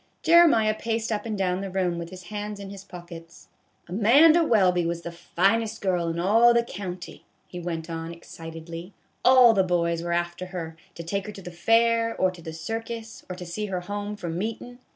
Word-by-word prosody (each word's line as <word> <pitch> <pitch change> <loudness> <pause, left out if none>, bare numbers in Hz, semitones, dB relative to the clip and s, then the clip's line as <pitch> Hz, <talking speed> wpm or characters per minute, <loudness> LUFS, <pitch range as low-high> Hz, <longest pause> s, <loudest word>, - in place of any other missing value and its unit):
Jeremiah 320 -11 +6
paced 225 +1 -2
up 215 +1 -2
and 215 -2 -3
down 185 -1 0
the 195 - -4
room 180 -2 -1
with 170 0 -6
his 185 0 -10
hands 210 +2 -6
in 195 -1 -8
his 195 -1 -9
pockets. 170 -3 -12 0.2
" - - -42
Amanda 275 - +5
Welby 185 - +3
was 170 0 -3
the 170 - -5
finest 200 +6 0
girl 180 -3 0
in 165 0 -2
all 225 +6 +5
the 235 - +4
county," 185 -5 -7 0.2
he 180 - -8
went 165 -2 -4
on, 165 0 -5
excitedly; 165 +1 -9
" - - -43
all 250 -2 +7
the 195 - +3
boys 170 -2 0
were 170 0 -3
after 175 +1 -2
her, 170 -3 -6 0.2
to 170 - -7
take 200 +4 -3
her - - -5
to 195 - -10
the 175 - -7
fair, 230 +5 +2
or 185 - +2
to 180 -2 -13
the 160 -1 -7
circus, 225 +6 -6
or 180 - -4
to 180 0 -8
see 210 +5 -4
her 185 -2 -3
home 205 +2 -5
from 170 -4 -4
meetin'. 230 +4 -5
185 Hz, 210 wpm, -25 LUFS, 170-220 Hz, 0.2 s, all